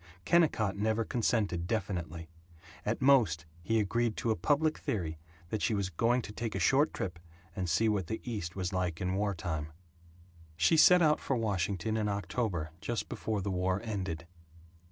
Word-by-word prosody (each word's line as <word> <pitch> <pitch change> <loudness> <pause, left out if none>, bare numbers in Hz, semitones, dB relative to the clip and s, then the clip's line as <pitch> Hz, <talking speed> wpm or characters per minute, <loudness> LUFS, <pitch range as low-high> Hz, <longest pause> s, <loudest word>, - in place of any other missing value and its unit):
Kennicott 150 - +3
never 110 +2 +1
consented 105 -8 0
definitely. 90 -6 -3 0.6
At 115 +4 0
most 110 - +4 0.2
he 115 +6 +1
agreed 115 +2 0
to 115 - 0
a - - +2
public 150 - +1
theory 80 -6 -3 0.3
that 110 +1 -2
she 115 - +1
was 100 -2 -1
"going 120 +8 +2
to - - -7
take 110 0 -4
a - - -1
short 135 - +3
trip 90 -2 -4 0.4
and 90 -2 -2
see 100 +8 +3
what 100 -5 0
the 110 - -3
East 105 -8 -4
was 95 0 -3
like 90 -3 -1
in 90 0 -1
wartime." 90 -6 -2 0.9
She 85 - +4
set 180 +2 +7
out 150 -1 +4
for 135 - -1
Washington 100 -1 -1
in 105 -1 0
October 95 -4 -2
just 120 -1 -3
before 110 -2 -2
the 100 - -2
war 95 +1 0
ended. 95 -8 -3
100 Hz, 170 wpm, -31 LUFS, 90-115 Hz, 0.9 s, set